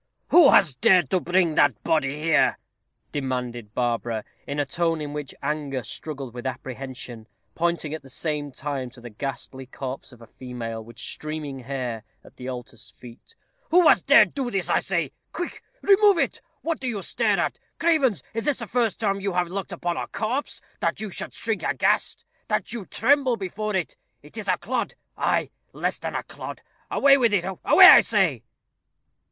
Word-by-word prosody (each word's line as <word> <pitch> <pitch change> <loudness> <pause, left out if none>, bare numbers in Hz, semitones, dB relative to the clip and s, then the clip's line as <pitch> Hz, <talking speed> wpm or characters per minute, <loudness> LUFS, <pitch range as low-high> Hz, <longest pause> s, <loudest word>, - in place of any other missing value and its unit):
"Who 340 -6 +8
has 170 -9 +5
dared 165 +4 +4
to 185 - +3
bring 175 -1 +2
that - - +3
body 145 -3 +1
here?" 160 +1 +3 0.5
demanded 125 -5 -4
Barbara, 115 -2 -1 0.2
in 140 +1 -3
a 145 - +1
tone 165 +3 0
in 145 -1 -5
which 150 -2 -6
anger 140 -3 -2
struggled 135 +1 -6
with 125 +1 -5
apprehension, 130 -3 -7 0.3
pointing 170 -3 -1
at 160 - -4
the 135 - -15
same 145 +1 -2
time 135 -1 -4
to 125 0 -15
the 120 -1 -10
ghastly 130 +2 -6
corpse 135 +1 -7
of 120 - -16
a 115 - -13
female, 115 -2 -7
with 115 +1 -14
streaming 155 -3 -5
hair, 125 -4 -4 0.2
at - - -17
the 125 - -8
altar's 120 -3 -8
feet. 125 - -15 0.3
"Who 355 -1 +6
has - - +6
dared - - +5
to 275 -2 -1
do - - -2
this, 195 -5 -1
I - - +4
say? 170 -7 -1 0.2
Quick! 350 +1 -5 0.2
remove 405 -1 +6
it. - - -1 0.2
What 330 -1 -1
do 260 - -4
you 210 -6 -3
stare - - +1
at? - - -1 0.2
Cravens! 275 - +2
is 225 0 -3
this 295 -3 +2
the 230 - -5
first 230 -1 0
time 200 -3 0
you 195 -1 -2
have 175 -1 0
looked 195 +1 -4
upon 175 -1 -3
a - - -3
corpse, 245 +6 -3 0.2
that - - -1
you 215 -2 -4
should - - -6
shrink 225 -4 -2
aghast - - 0 0.2
that - - -1
you 225 -6 -6
tremble 265 0 +2
before 210 +2 -3
it? 180 -4 -2 0.3
It 150 - -16
is 215 -3 -6
a 185 -1 +2
clod 255 +1 -3 0.2
ay, - - 0 0.2
less - - -2
than - - -5
a - - -2
clod. - - -8 0.3
Away 275 0 +5
with 235 -4 +3
it! 175 -3 0 0.2
away, - - +8
I - - +11
say." - - +1
155 Hz, 185 wpm, -25 LUFS, 130-210 Hz, 0.5 s, I